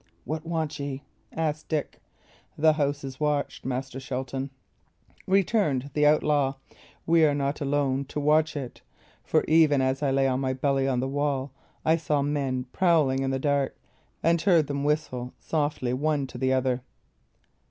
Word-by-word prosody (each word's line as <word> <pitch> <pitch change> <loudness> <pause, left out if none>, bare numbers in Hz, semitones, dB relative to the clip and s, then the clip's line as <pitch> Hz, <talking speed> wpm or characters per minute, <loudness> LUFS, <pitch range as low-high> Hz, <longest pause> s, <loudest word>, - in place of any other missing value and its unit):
"What 155 +4 -4
want 160 -3 -2
ye?" 140 -1 -4 0.3
asked 155 -1 -2
Dick. 155 -3 -3 0.6
"The 155 +1 +5
house 145 -1 -1
is 135 -1 -7
watched, 150 -1 -1
Master 130 0 -3
Shelton," 130 0 -4 0.8
returned 185 - +1
the 150 -1 +3
outlaw. 145 -2 +2 0.5
"We 165 0 +4
are 145 -2 +4
not 140 +1 -2
alone 140 -1 0
to 150 - -5
watch 155 +2 +2
it; 130 -4 -7 0.4
for - - +2
even 155 -3 +5
as 130 +1 0
I 145 - +1
lay 135 0 +2
on 130 0 0
my 130 -1 0
belly 135 0 +1
on 125 -2 +1
the 130 - -1
wall 140 -1 -1 0.3
I 160 +1 +4
saw 150 -3 0
men 140 -3 -1
prowling 155 -8 +3
in 135 - 0
the 135 - 0
dark, 140 0 0 0.5
and 165 0 +3
heard 170 -4 +4
them 140 0 -3
whistle 145 -5 -1
softly 145 -5 -1
one 145 +1 0
to - - -9
the 130 0 +1
other." 130 -1 +1
140 Hz, 165 wpm, -26 LUFS, 135-155 Hz, 0.8 s, The